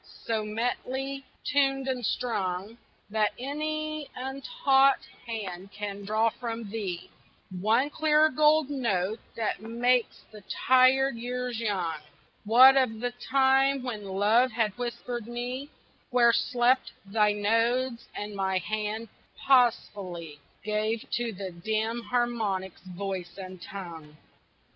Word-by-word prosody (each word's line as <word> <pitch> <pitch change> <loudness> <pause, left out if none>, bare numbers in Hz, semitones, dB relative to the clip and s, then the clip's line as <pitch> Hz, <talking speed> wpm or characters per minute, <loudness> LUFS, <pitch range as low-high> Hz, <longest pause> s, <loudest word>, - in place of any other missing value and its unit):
so 220 -2 0
metely 255 +5 -3 0.2
tuned 270 -1 +2
and 255 -2 -2
strung 205 -3 -2 0.4
That 215 -1 +1
any 310 +2 -3
untaught 270 - +2 0.3
hand 195 -4 -5
can 205 -1 -6
draw 220 +2 +2
from 230 -3 -6
thee 195 -6 -4 0.4
One 220 +10 +1
clear 310 0 +4
gold 300 0 +3
note 220 -6 0 0.2
that 225 -2 -2
makes 240 +2 +1
the 210 -1 -12 0.3
tired 260 0 +5
years 245 0 -3
young 185 -8 -1 0.5
What 255 +5 +8
of 225 -5 +1
the 245 +1 -2 0.2
time 270 0 +4
when 220 -5 -5
Love 210 +6 +3
had 220 -4 0
whispered 240 -1 -4
me 250 +4 -4 0.4
Where 240 -1 +5
slept 250 +2 +2
thy 210 +1 +2
nodes, 230 +4 +1
and 205 0 -5
my 190 -1 0
hand 215 +4 -3 0.4
pausefully 195 - +1 0.2
Gave 215 +1 -1
to 240 -1 -1
the 190 -2 -6
dim 220 +6 -2
harmonics 220 -7 -1
voice 185 -1 -5
and 185 -2 -8
tongue? 165 -6 -9
230 Hz, 115 wpm, -28 LUFS, 205-255 Hz, 0.5 s, What